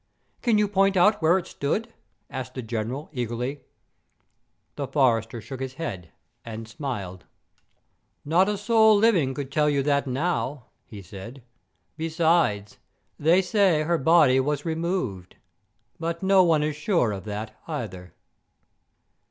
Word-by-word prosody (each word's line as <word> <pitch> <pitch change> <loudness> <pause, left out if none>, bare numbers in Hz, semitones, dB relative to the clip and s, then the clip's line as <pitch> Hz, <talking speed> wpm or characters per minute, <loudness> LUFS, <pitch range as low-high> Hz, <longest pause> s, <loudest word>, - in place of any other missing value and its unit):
"Can 235 -4 +2
you 210 0 +3
point 195 -1 +2
out 210 +3 +4
where 165 +3 +4
it 185 - -4
stood?" 220 +11 -3 0.3
asked 130 -1 -7
the 130 - -5
General, 120 +6 -4
eagerly. 125 +2 -3 1.1
The 140 - -4
forester 120 -5 +1
shook 125 +5 -8
his 130 0 -5
head, 95 - -6 0.3
and 115 -1 -7
smiled. 110 - -6 1.0
"Not 175 +6 +3
a 210 - -1
soul 220 0 +4
living 185 - +3
could 140 -2 -5
tell 150 +1 +2
you 140 -2 +1
that 140 -1 +1
now," 140 -2 -2 0.2
he 100 -3 -10
said; 115 +8 -10 0.5
"besides, 160 - +1 0.4
they 170 +5 +4
say 185 -5 +2
her 170 +1 0
body 150 -3 +5
was 145 +1 -1
removed; 160 - -3 0.6
but 170 +2 -3
no 190 0 +5
one 160 -4 +3
is 150 -1 -1
sure 155 - +1
of 95 -3 -6
that 105 +1 -6
either." 95 - -6
145 Hz, 135 wpm, -25 LUFS, 120-170 Hz, 1.1 s, body